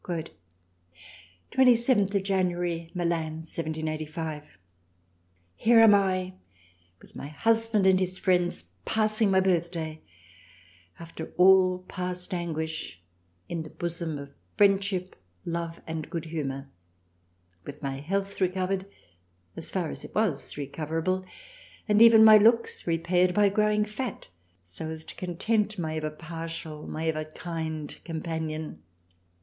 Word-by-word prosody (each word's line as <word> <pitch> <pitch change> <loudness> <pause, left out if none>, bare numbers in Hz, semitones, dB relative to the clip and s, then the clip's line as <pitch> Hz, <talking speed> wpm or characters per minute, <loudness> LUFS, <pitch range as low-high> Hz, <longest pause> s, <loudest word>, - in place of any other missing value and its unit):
27th 235 -6 +3
January. 175 -3 -1
Milan. 165 -2 -1
1785. 155 - -5 1.0
Here 230 - +5
am 225 -2 +8
I! 185 -2 +1 0.7
with - - -18
my - - -6
Husband 225 +6 +1
and 190 -1 +5
his 185 0 -1
Friends 180 -2 +1 0.2
passing 215 - +2
my 190 -1 +4
Birthday 170 -4 -1 1.0
(after 165 -1 -8
all 185 0 +5
past 180 +1 -5
Anguish) 160 - -4 0.5
in 170 -1 -3
the 155 - -8
Bosom 170 -2 -4
of 140 0 -9 0.3
Friendship, 195 -2 +2 0.3
Love 170 0 -3
and 160 -1 -5
good 170 -3 -4
humour: 140 -4 -4 1.0
with 145 +1 -10
my 135 -1 -3
health 195 +6 -3
recovered 185 +1 0 0.7
as - - -2
far 175 -5 -2
as - - -8
it - - -11
was 200 -13 -1
recoverable 160 +6 -2 0.6
and 210 0 +4
even 230 -1 +9
my 215 -1 +10
looks 230 -1 +3
repaired 175 +2 +2
by 205 -1 +5
growing 210 +1 +2
fat, 220 - -5 0.3
so 90 - -8
as 160 0 -7
to - - -8
content 210 +4 -1
my 160 -2 -2
ever 155 -1 -2
partial, 160 -1 -7
my 160 +1 -4
ever 155 -1 0
kind 160 -1 -5
companion. 160 - -4
175 Hz, 120 wpm, -27 LUFS, 160-195 Hz, 1.0 s, my